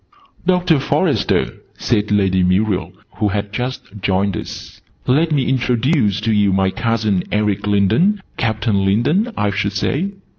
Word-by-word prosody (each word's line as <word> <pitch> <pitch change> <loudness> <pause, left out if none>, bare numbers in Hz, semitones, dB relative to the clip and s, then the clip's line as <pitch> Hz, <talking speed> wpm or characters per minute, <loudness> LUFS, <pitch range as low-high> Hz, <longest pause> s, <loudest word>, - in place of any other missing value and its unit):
"Doctor 180 -4 +3
Forester," - - 0 0.2
said 105 0 0
Lady 95 -3 +2
Muriel, 90 -1 +1 0.3
who 105 - +1
had 100 0 -3
just 125 +3 -3 0.2
joined 95 0 0
us, - - -8 0.2
"let 155 +6 +2
me 140 -4 +1
introduce 125 - +1
to 115 - 0
you 105 -1 +3
my 95 0 +1
cousin 115 -4 0
Eric 105 -1 0
Lindon 105 - +2 0.2
Captain 110 -2 0
Lindon, 145 - +1
I 105 -1 +1
should 100 +1 -1
say." 155 - -1
105 Hz, 140 wpm, -18 LUFS, 100-130 Hz, 0.3 s, Doctor